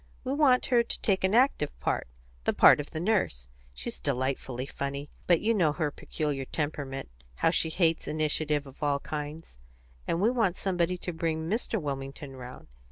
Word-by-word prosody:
We 260 0 -1
want 280 -4 +4
her 240 - +7
to 235 - -3
take 195 -3 +1
an 190 +3 +3
active 245 - +2
part - - -1 0.4
the - - +2
part - - +7
of 145 - -4
the 160 - -5
Nurse. 175 - 0 0.2
She's - - -6
delightfully 130 - -2
funny. 140 +1 -5 0.2
But 175 -2 +4
you 225 +2 +3
know 170 -8 +3
her 155 -2 -1
peculiar 145 -2 -3
temperament 140 -2 -3 0.3
how 160 - +3
she 165 - +2
hates 165 -1 +1
initiative 150 -1 0
of 135 +2 -14
all 145 -1 +2
kinds; 150 - -6 0.5
and 165 - 0
we 215 +5 +4
want 220 -8 +1
somebody 180 -2 0
to 180 0 -5
bring 160 -1 -1
Mr. 220 +2 0
Wilmington 135 -2 -5
round. 125 -1 -9
155 Hz, 175 wpm, -29 LUFS, 140-185 Hz, 0.5 s, her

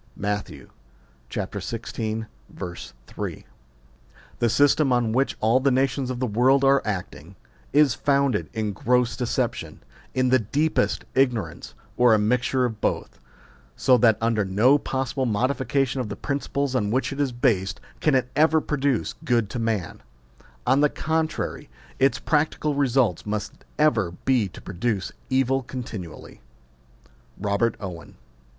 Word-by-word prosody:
Matt. 105 0 -2 0.8
xvi. 110 -1 -4 0.2
3. 60 -9 -7 0.9
The 120 - +2
system 145 +2 +3
on 120 -2 +2
which 130 +4 0
all 115 +4 +3
the 140 +1 +2
nations 135 0 +1
of 125 -1 -3
the 130 - 0
world 125 +5 +3
are 135 0 +5
acting, 95 -4 -5 0.4
is 145 -3 +5
founded 140 -5 +1
in 110 -3 -2
gross 125 +1 +1
deception, 120 - -2 0.3
in 130 -1 +2
the 130 +1 +5
deepest 145 +9 0
ignorance, 125 -5 0 0.2
or 120 -2 +6
a - - +3
mixture 125 +4 +1
of 110 -3 -4
both: - - -2 0.6
so 130 - +4
that 110 -2 +5
under 115 -2 +1
no 110 +9 +4
possible 130 -1 -2
modification 130 +3 0
of 115 - -5
the - - -4
principles 140 -1 -2
on 105 -6 0
which 130 +4 0
it 135 - -8
is 140 -3 0
based 110 -6 0 0.2
can 150 -3 +2
it 130 -1 +2
ever 160 +1 +4
produce 140 -7 -1
good 120 -8 +1
to 125 - -3
man; 110 -7 -2 0.6
on 135 +2 +3
the 150 - +4
contrary, 160 +1 -2 0.3
its 135 +1 +3
practical 150 -1 0
results 130 - +1
must 105 -1 -4
ever 110 - +2
be 125 -6 +3
to 90 - -12
produce 95 +1 -2 0.2
evil 135 0 +2
continually. 115 -9 -8 1.0
ROBEET 105 +3 0
OWEX. 90 -5 -8
125 Hz, 135 wpm, -24 LUFS, 110-135 Hz, 1.0 s, or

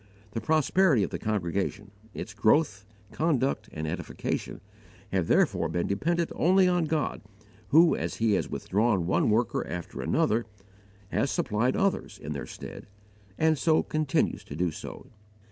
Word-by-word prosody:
The 115 - -3
prosperity 155 - +3
of - - -3
the - - -4
congregation, 100 0 -2 0.2
its 105 - -7
growth, 105 -1 +2 0.2
conduct, 135 -8 0
and 80 0 -4
edification, 75 - -4 0.5
have 95 -4 0
therefore - - +2
been 85 +1 -1
dependent 165 +12 0
only 185 +2 +4
on 180 -2 +2
God, 155 -1 -1 0.5
who, 160 +7 +6
as - - -3
He 115 -1 +1
has 100 - +1
withdrawn 100 -3 0
one 95 - +2
worker 110 +1 +1
after 90 -1 -5
another, 115 +2 +1 0.6
has 135 - 0
supplied 115 +4 0
others 195 -1 0
in 75 +1 -6
their 70 - -5
stead, - - -9 0.5
and 160 -2 +2
so 160 0 +3
continues 155 -3 0
to 70 - -8
do. 85 +1 0
115 Hz, 145 wpm, -28 LUFS, 100-155 Hz, 0.6 s, who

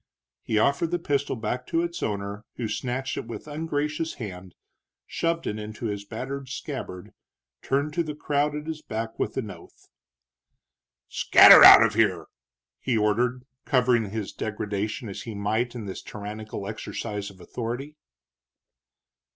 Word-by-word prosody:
He 110 - -1
offered 140 +8 +2
the 175 - 0
pistol 145 -5 -1
back 125 +2 -4
to 165 +1 +1
its 170 0 -4
owner, 100 0 -3
who 120 - -3
snatched 130 +4 -3
it - - -5
with 115 - -8
ungracious 150 +1 -2
hand, 95 -6 -8 0.5
shoved 165 0 -1
it 105 - -3
into 105 +2 -7
his 100 -2 -3
battered 130 +5 -6
scabbard, 130 - -6 0.5
turned 145 +2 -1
to 170 - +1
the 150 -2 -6
crowd 145 0 0
at 150 0 -5
his 160 -1 -5
back 110 -2 -5
with - - -2
an - - -3
oath. - - -16 1.2
"Scatter - - +8
out - - +11
of 115 -1 +2
here!" 100 -7 +2 0.5
he 125 -4 0
ordered, 120 +4 +1 0.2
covering 125 -5 +2
his 105 -1 -5
degradation 105 +2 -3
as 100 - -6
he 115 -3 -7
might 110 +5 -1
in 115 -3 -6
this 95 - -6
tyrannical 105 -1 -7
exercise 105 -1 -5
of 95 -1 -16
authority. 125 +9 -5
115 Hz, 150 wpm, -26 LUFS, 105-145 Hz, 1.2 s, out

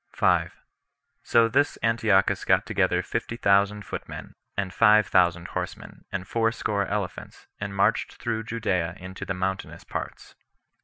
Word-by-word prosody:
5. - - +2 0.6
So 115 -1 +4
this 145 +6 +1
Antiochus 115 -4 +2
got - - +3
together - - +1
fifty 115 - -3
thousand 100 -1 +2
footmen, - - -7 0.2
and 95 -2 -2
five 105 -2 +5
thousand 90 -2 +2
horsemen, - - -6
and 95 -1 -4
fourscore 115 -3 0
elephants, 100 -3 -5
and 100 -1 -5
marched 100 +3 +1
through 110 -2 -2
Judea 95 -7 -1
into 95 +1 -8
the 95 - -3
mountainous 95 +1 -3
parts. - - -7
100 Hz, 135 wpm, -26 LUFS, 95-115 Hz, 0.6 s, five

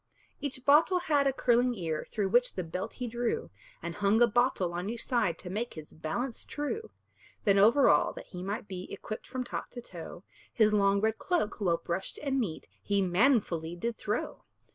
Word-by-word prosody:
Each 265 -3 -4
bottle 310 +6 +6
had 300 -6 +2
a - - +4
curling 245 -1 +2
ear, 165 -6 -3
Through 200 -3 -1
which 245 +4 +3
the 185 - -2
belt 175 +3 -5
he 250 - -5
drew, 240 0 -2 0.3
And 170 0 -3
hung 205 +3 +2
a 240 - +8
bottle 235 -6 +1
on 180 +3 -3
each 235 0 -4
side, 220 -10 +1
To 180 - -9
make 230 +5 -3
his 155 -2 -10
balance 225 +11 -3
true. 300 +10 -4 0.5
Then 200 -3 +4
over 230 +8 +6
all, - - +4
that - - -9
he 180 - -8
might 205 +4 -4
be 185 -1 -7
Equipped 215 - -6
from 255 0 -3
top 245 - -5
to 245 - -8
toe, 175 -2 -9 0.3
His 215 -2 +3
long 200 -1 +3
red 220 +1 +1
cloak, 340 - -1
well 175 -4 +2
brushed 170 +3 -4
and 270 -2 +1
neat, 190 -10 -3
He 200 -1 +1
manfully 180 - +2
did 230 +6 -3
throw. 210 +1 -3
215 Hz, 195 wpm, -30 LUFS, 185-250 Hz, 0.5 s, a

